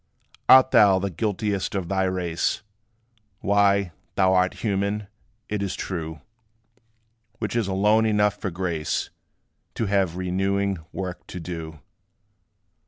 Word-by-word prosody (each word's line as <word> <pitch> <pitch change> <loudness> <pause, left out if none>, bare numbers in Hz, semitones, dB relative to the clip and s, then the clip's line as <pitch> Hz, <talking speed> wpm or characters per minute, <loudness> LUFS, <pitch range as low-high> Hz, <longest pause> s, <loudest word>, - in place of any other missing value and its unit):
Art 130 0 +8
thou 100 -2 +6
the 95 +1 -2
guiltiest 100 +2 -2
of 95 -3 -2
thy 95 +1 +1
race? 90 +1 -1 0.8
Why, 100 -2 +3 0.2
thou 95 -1 +4
art 95 0 +2
human, 100 0 0 0.4
it 105 -1 -2
is 100 -2 -2
true; 80 -4 -5 1.2
Which 110 -1 -3
is 115 -4 +1
alone 105 +3 +3
enough 105 -1 +3
for 105 -1 -4
grace 85 -3 -2 0.6
To 115 - -1
have 95 -4 +1
renewing 95 +1 0
work 90 -2 -6
to 90 - -7
do. 80 -3 -7
95 Hz, 120 wpm, -24 LUFS, 90-100 Hz, 1.2 s, Art